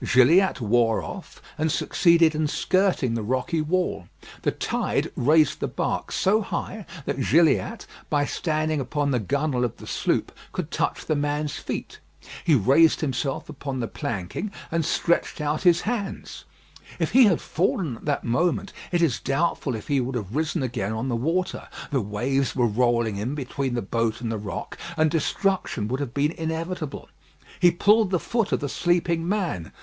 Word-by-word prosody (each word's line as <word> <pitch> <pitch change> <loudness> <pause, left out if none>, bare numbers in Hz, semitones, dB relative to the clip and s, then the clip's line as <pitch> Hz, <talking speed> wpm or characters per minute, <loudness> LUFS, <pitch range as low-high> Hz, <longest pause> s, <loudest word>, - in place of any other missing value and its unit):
Gilliatt 160 +11 +4
wore 115 0 +2
off, 195 - -9 0.2
and 155 0 +1
succeeded 170 -1 +4
in 155 0 0
skirting 185 -6 +1
the 115 - -1
rocky 130 +8 -1
wall. 160 - -1 0.3
The - - +1
tide - - -1
raised 150 +2 +3
the - - -1
bark - - -2
so 210 +4 +2
high 205 0 -4 0.2
that 135 - -2
Gilliatt, 150 - +2 0.2
by 145 -1 +2
standing 155 0 -1
upon 145 +2 -1
the 125 - +2
gunwale 140 +3 0
of 120 - -2
the - - -11
sloop, - - 0 0.2
could - - -4
touch - - -1
the 155 - +1
man's 145 0 -1
feet. - - -5 0.4
He 160 - +4
raised 140 +8 +4
himself 135 -2 -2
upon 140 -3 -5
the 115 - -1
planking, 105 - -4 0.2
and 165 0 +1
stretched 170 +3 0
out 150 0 -1
his 175 -2 +5
hands. 215 -3 -4 0.5
If - - -1
he 260 -1 +7
had 185 -7 +3
fallen 165 - -1
at - - -15
that 145 -2 0
moment, 160 +9 0 0.2
it 175 -1 +2
is 145 -8 +2
doubtful 140 -2 0
if 110 - -8
he 140 -1 +2
would 125 +1 -3
have 105 -2 -4
risen 155 0 0
again 110 -4 -2
on 120 +4 -2
the 120 - 0
water; 170 +10 -1 0.2
the 135 -3 +1
waves 125 +6 -1
were 125 - +3
rolling 115 -1 +1
in 120 +8 -2
between 135 -2 -3
the 120 - -1
boat 115 +2 -1
and 115 -2 -3
the 110 - -2
rock, 100 -4 -6 0.2
and 155 -1 +3
destruction 165 - 0
would 130 +2 -1
have 140 -3 -4
been 145 +2 +2
inevitable. 160 -1 -4 0.5
He 175 - +7
pulled 205 +4 +4
the 180 -2 +1
foot 230 +2 -1
of - - +1
the 145 - -1
sleeping 170 +2 0
man. 175 - -2
145 Hz, 175 wpm, -25 LUFS, 120-170 Hz, 0.5 s, he